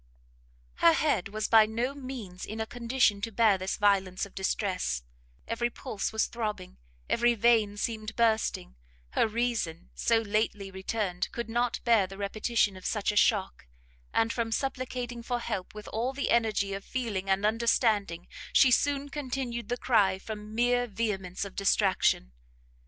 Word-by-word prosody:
Her 335 - +6
head 285 - +1
was 215 +1 -2
by 220 -1 +6
no 235 +5 -2
means 255 -10 -8
in 220 +1 -6
a 220 - -1
condition 235 -3 +1
to 225 - -3
bear 215 -3 +3
this 185 +1 -2
violence 195 -3 +2
of 200 - -15
distress; 185 - -1 0.4
every 240 +1 0
pulse 235 -3 -4
was 220 0 +1
throbbing, 210 - -5 0.3
every 240 0 +3
vein 220 -2 +3
seemed 220 0 -3
bursting, 220 - +1 0.4
her - - +2
reason, 220 -7 -2
so 230 - +2
lately 210 -2 -1
returned, 190 -1 -2
could 235 -1 -4
not 240 +1 0
bear 230 -5 +4
the 195 +1 -10
repetition 205 +1 0
of 185 - -11
such 210 -2 0
a - - -6
shock, 200 - +2 0.4
and 225 0 +1
from 230 -2 -2
supplicating 250 -1 -3
for 245 +1 -2
help 215 -5 -4
with 210 -1 -9
all 240 +4 -2
the 280 +1 -2
energy 215 -4 +2
of 195 0 -5
feeling 210 -7 -3
and 195 +1 +2
understanding, 215 -5 +1 0.3
she 265 - +6
soon 285 +3 +2
continued 260 -4 -4
the 245 - -1
cry 205 -7 +3
from 210 +1 -8
mere 245 +1 +2
vehemence 195 -4 -3
of 195 - -10
distraction. 195 - +2
220 Hz, 155 wpm, -29 LUFS, 200-240 Hz, 0.4 s, Her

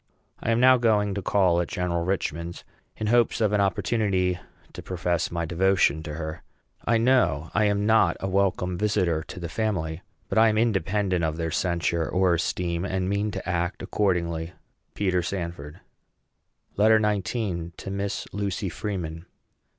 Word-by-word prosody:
I - - -2
am 115 0 +3
now 130 +1 +7
going 105 -4 +2
to 100 - -3
call 90 -2 +3
at 85 - -3
General 85 -1 -1
Richman's, 85 -2 -3 0.3
in 110 - -3
hopes 120 +2 +3
of 105 -2 +2
an 105 - +3
opportunity 95 -3 +1 0.3
to - - -7
profess 85 -2 -1
my 85 -1 -2
devotion 90 -2 +2
to 75 -1 -6
her. 80 0 -5 0.4
I 115 - +2
know 100 - +2
I 105 +1 +3
am 100 0 +1
not 110 +1 +4
a 95 - -3
welcome 95 -2 0
visitor 95 -7 +1
to 90 - -9
the 85 - -4
family; 85 -5 -2 0.3
but - - +1
I 115 0 +6
am 110 - 0
independent 100 -4 +1
of 80 0 -1
their 80 -1 -2
censure 85 -1 0
or 90 -1 +3
esteem, 85 0 -1
and 95 -1 -1
mean 100 +1 0
to - - -6
act 90 +1 -1
accordingly. 85 -4 -1 0.4
PETER 95 -3 +1
SANFORD. 85 -3 -5 1.0
LETTER 110 +2 +5
XIX. 100 -4 -1
TO 95 - -6
MISS 100 0 -3
LUCY 100 -1 -2
FREEMAN. 85 -2 -5
95 Hz, 160 wpm, -25 LUFS, 85-105 Hz, 1.0 s, now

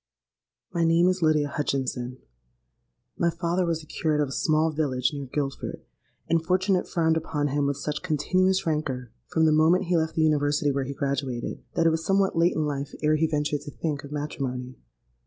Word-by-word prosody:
"My 170 - +1
name 165 +2 +4
is 185 0 -1
Lydia 155 -2 +3
Hutchinson. 130 -3 -2 1.0
My 170 - +3
father 170 +1 -1
was 165 -1 -1
the - - -14
curate 150 0 -1
of 145 -2 +1
a - - -8
small 155 +5 +2
village 135 -5 0
near 140 -2 -5
Guildford; 135 +1 -4 0.4
and 165 0 +2
fortune 190 +3 +2
had 180 - +1
frowned 160 -1 +2
upon 150 -2 -1
him 145 +1 +1
with 140 -1 -1
such 150 +1 -3
continuous 185 +4 +1
rancour 135 -7 -2 0.2
from 160 -1 +2
the 155 - +5
moment 160 +5 +4
he 175 -1 +1
left 160 0 -1
the 160 - +2
University 145 -1 +2
where 135 -1 -1
he 140 +1 -5
graduated, 135 -3 -2
that 165 - +2
it 165 - +5
was 160 0 -1
somewhat 195 +2 +2
late 170 +2 +3
in 155 - +1
life 140 -1 -3
ere 155 +1 +4
he 160 +1 +2
ventured 150 -1 -1
to 145 - -8
think 145 -1 -3
of 140 - -10
matrimony. 130 -4 -4
155 Hz, 195 wpm, -26 LUFS, 140-165 Hz, 1.0 s, the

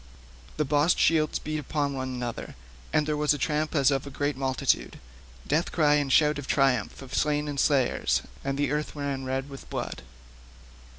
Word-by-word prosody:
The 150 - +1
bossed 145 +5 +3
shields 155 -2 +3
beat 155 0 -4
one 145 0 -1
upon - - -5
another, 125 -2 -4 0.4
and 155 - +2
there 150 0 0
was 150 0 +2
a - - -4
tramp 150 +3 -1
as 140 -1 +4
of 135 0 -1
a - - -5
great 145 +1 -1
multitude—death 65 - -2
cry 150 -3 +3
and 145 -2 +1
shout 150 +1 +4
of 140 - -7
triumph 135 -3 +1
of 130 - -11
slain 150 0 +1
and 145 -1 -3
slayers, 135 -4 +2 0.2
and 135 0 -2
the 145 -1 0
earth 150 +1 -2
ran 140 -2 -3
red 135 +1 -2
with 135 -1 -11
blood. - - -4
145 Hz, 180 wpm, -27 LUFS, 135-150 Hz, 0.4 s, as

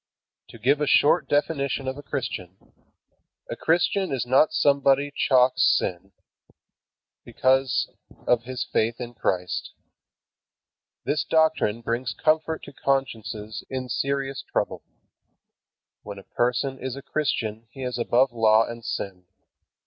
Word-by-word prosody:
To - - -12
give 140 +4 +2
a 150 - +1
short 145 +1 +4
definition 140 -2 0
of 130 - -2
a 145 - -8
Christian: 110 -11 -5 0.9
A - - -2
Christian 180 +3 +1
is 130 -3 -1
not 130 +5 +4
somebody 140 0 +3
who - - -20 0.2
chalks(sp) 125 0 +4 0.2
sin, 90 +2 -4 1.1
because 130 -1 +1 0.4
of 120 -1 +2
his 125 -1 -3
faith 115 0 0
in 120 -1 -6
Christ. 90 -5 -2 1.3
This 150 0 0
doctrine 160 -9 +2
brings 120 +2 -2
comfort 160 +1 +1
to - - -10
consciences 110 -6 -2
in 130 -1 -4
serious 135 +1 -2
trouble. - - -1 1.2
When 100 -1 -8
a 100 - -10
person 125 +4 -1
is 130 0 -4
a 140 - -9
Christian 115 -7 -2
he 135 +1 -9
is 125 -1 -3
above 125 +2 +3
law 110 -1 +4
and 115 0 -8
sin. 95 -5 -5
130 Hz, 130 wpm, -25 LUFS, 115-140 Hz, 1.3 s, short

